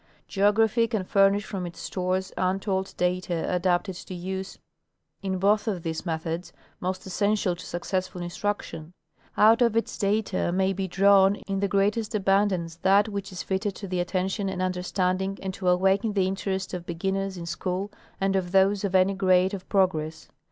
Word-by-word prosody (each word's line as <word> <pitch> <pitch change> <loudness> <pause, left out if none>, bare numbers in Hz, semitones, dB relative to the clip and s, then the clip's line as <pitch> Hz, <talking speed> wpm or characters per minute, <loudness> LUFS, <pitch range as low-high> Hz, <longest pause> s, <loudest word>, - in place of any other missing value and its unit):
Geography 220 +3 +3
can 220 -5 -1
furnish 195 +2 +3
from 185 -3 -4
its 170 - -10
stores 185 0 -2
untold 190 +1 -1
data 180 -2 0
adapted 180 +2 +1
to 180 +1 -8
use 190 +2 -5 0.6
in 190 -1 -2
both 205 +4 +2
of 190 -6 -2
these 160 +2 -4
methods 165 +1 -3 0.3
most 185 +1 -3
essential 200 -1 0
to 175 - -10
successful 185 +1 -3
instruc 200 +4 -2
tion. 160 +2 -9 0.4
Out 225 +3 +6
of 235 -2 +3
its 230 - -1
data 200 -3 0
may 190 +1 +1
be 190 0 -3
drawn 195 +1 +5
in 195 -1 -1
the 200 - +1
greatest 210 +3 0
abundance 195 -4 +1
that 195 +3 +4
Avhich 200 -1 -4
is 185 - -5
fitted 195 +1 -2
to 200 - -7
the 180 -1 -2
attention 190 +2 -1
and 190 -1 -4
understanding 185 +1 -1
and 190 -1 -4
to 185 0 -4
awaken 190 +4 +2
the 195 -2 +2
interest 190 0 -2
of 175 -1 -5
beginners 190 +2 -2
in 170 - -6
school 180 +4 -3 0.3
and 195 0 +1
of 180 -2 -1
those 195 +1 +4
of 195 -2 -1
any 185 +1 +4
grade 185 0 +3
of 190 -2 -7
progress. 160 -5 0
190 Hz, 175 wpm, -26 LUFS, 180-200 Hz, 0.6 s, Out